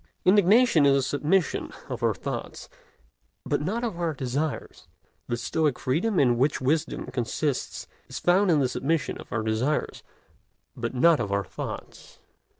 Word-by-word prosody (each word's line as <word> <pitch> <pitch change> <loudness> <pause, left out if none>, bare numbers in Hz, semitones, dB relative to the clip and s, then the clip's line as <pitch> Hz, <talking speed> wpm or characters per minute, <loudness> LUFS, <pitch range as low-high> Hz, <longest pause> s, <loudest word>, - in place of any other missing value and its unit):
Indignation 205 - +5
is 140 - +5
a 135 - +3
submission 150 +6 0 0.2
of - - -5
our - - +2
thoughts, - - -6 0.8
but - - 0
not 215 +10 -2
of 215 -8 -3
our 165 -3 -1
desires; 135 - -3 0.4
the 120 - -1
Stoic 150 +3 0
freedom 175 +10 0
in 120 -3 +3
which 140 +3 +2
wisdom 150 +4 -1
consists 130 +3 -2 0.2
is - - -7
found 185 +3 +3
in 160 -3 +4
the 135 - +2
submission 150 +5 -1
of - - -12
our 110 - -1
desires, 110 +7 -1 0.7
but 120 +1 -4
not 165 +5 +5
of 105 -3 -2
our 100 0 0
thoughts. - - -8
150 Hz, 155 wpm, -26 LUFS, 125-170 Hz, 0.8 s, Indignation